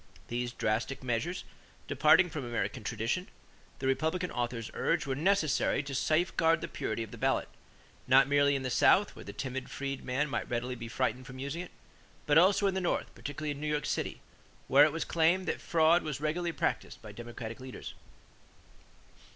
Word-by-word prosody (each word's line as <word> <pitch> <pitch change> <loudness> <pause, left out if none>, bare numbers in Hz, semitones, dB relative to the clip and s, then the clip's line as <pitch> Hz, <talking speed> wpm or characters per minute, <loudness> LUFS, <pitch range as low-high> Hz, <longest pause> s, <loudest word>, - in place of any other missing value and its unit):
These 120 0 -2
drastic 115 +5 -1
measures, 130 +9 -2 0.4
departing 150 +6 +5
from 150 -3 -4
American 120 0 -3
tradition, 115 - -2 0.5
the 135 - -5
Republican 160 +7 0
authors 120 -2 -3
urged, 165 -2 0
were 135 - -1
necessary 155 -2 +2
to 140 0 -6
safeguard 165 +3 +2
the - - -3
purity 110 +1 -3
of 110 - -10
the - - -10
ballot, - - +1 0.6
not - - +6
merely 140 0 +3
in 135 - -2
the 130 - -2
South - - +4
where - - -10
the - - -6
timid 130 -1 -5
freedman 140 0 -2
might 135 - -3
readily 120 +1 -2
be 115 -1 -7
frightened 125 +1 -2
from 130 - -9
using 140 +6 -4
it; 180 - -8 0.6
but 150 +1 +6
also 195 +3 +4
in 195 - +2
the 190 - -1
North, 175 - -1
particularly 145 +1 -5
in 145 0 -6
New 150 - -2
York 150 -1 -1
City, - - -2 0.5
where 140 +3 +7
it 155 - +1
was 165 +2 -3
claimed 170 +3 +2
that - - -2
fraud 165 +1 +4
was 150 -2 -4
regularly 165 +3 -1
practiced - - -2
by - - -8
Democratic 120 -1 -7
leaders. 130 0 -8
140 Hz, 180 wpm, -31 LUFS, 125-160 Hz, 0.6 s, where